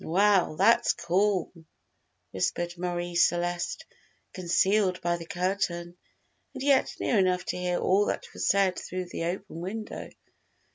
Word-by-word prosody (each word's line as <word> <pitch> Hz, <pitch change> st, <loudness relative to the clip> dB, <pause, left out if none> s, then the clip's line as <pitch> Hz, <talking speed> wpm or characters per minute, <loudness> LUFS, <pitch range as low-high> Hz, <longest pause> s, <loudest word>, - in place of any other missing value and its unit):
"Well, 190 Hz, -1 st, +3 dB
that's 205 Hz, +8 st, +4 dB
cool," 185 Hz, +1 st, 0 dB, 0.8 s
whispered 175 Hz, -, -2 dB
Marie 175 Hz, 0 st, -3 dB
Celeste, 175 Hz, 0 st, +1 dB, 0.5 s
concealed 185 Hz, +1 st, +2 dB
by 175 Hz, 0 st, 0 dB
the 165 Hz, -1 st, -9 dB
curtain, 175 Hz, -2 st, -2 dB, 0.6 s
and -, -, -5 dB
yet 275 Hz, -2 st, +3 dB
near 225 Hz, -, +2 dB
enough 180 Hz, -1 st, +1 dB
to -, -, -3 dB
hear 180 Hz, -1 st, -1 dB
all 200 Hz, +2 st, +2 dB
that -, -, -2 dB
was -, -, -2 dB
said 195 Hz, -2 st, +2 dB
through 185 Hz, -1 st, -5 dB
the 165 Hz, -, -4 dB
open 175 Hz, -1 st, -4 dB
window. 215 Hz, +4 st, -6 dB
180 Hz, 135 wpm, -27 LUFS, 175-195 Hz, 0.8 s, that's